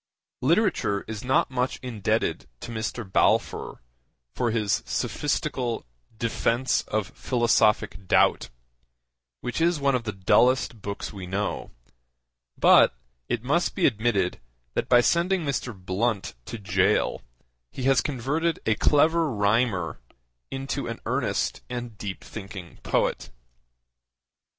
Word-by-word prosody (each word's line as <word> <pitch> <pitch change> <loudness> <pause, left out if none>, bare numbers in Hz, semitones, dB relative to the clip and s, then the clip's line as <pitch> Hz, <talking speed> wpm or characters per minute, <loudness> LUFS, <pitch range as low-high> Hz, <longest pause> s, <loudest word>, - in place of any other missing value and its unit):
Literature 155 - +2
is 110 0 -6
not 130 +2 +2
much 130 +1 -1
indebted 110 -6 -1
to - - -7
Mr. 110 +1 -3
Balfour 95 - +1 0.5
for 120 - 0
his 110 -3 +1
sophistical 135 -5 -2 0.3
Defence 115 +3 +1
of 105 -2 -1
Philosophic 110 - +1
Doubt - - +3 0.9
which 125 - -3
is 170 -1 +3
one 140 -1 +2
of 125 -2 0
the 110 - -1
dullest 115 +4 +2
books 100 +1 -5
we 95 -3 -7
know, 100 +3 -2 0.9
but - - +6 0.3
it - - -1
must 155 +7 +1
be 185 - +2
admitted 105 -6 +1 0.3
that - - -2
by 120 -1 +7
sending 175 +5 +2
Mr. 135 -3 -2
Blunt 100 +2 -2
to 115 - -6
gaol 100 - +1 0.5
he 130 - -7
has 135 -1 +4
converted 150 +4 -1
a 110 - +3
clever 160 +6 +3
rhymer 105 -4 +1 0.5
into 135 -1 -3
an 115 -1 -5
earnest - - -1
and 120 -2 -5
deep 100 -2 -5
thinking 95 -4 -9
poet. - - 0
120 Hz, 120 wpm, -26 LUFS, 105-135 Hz, 0.9 s, by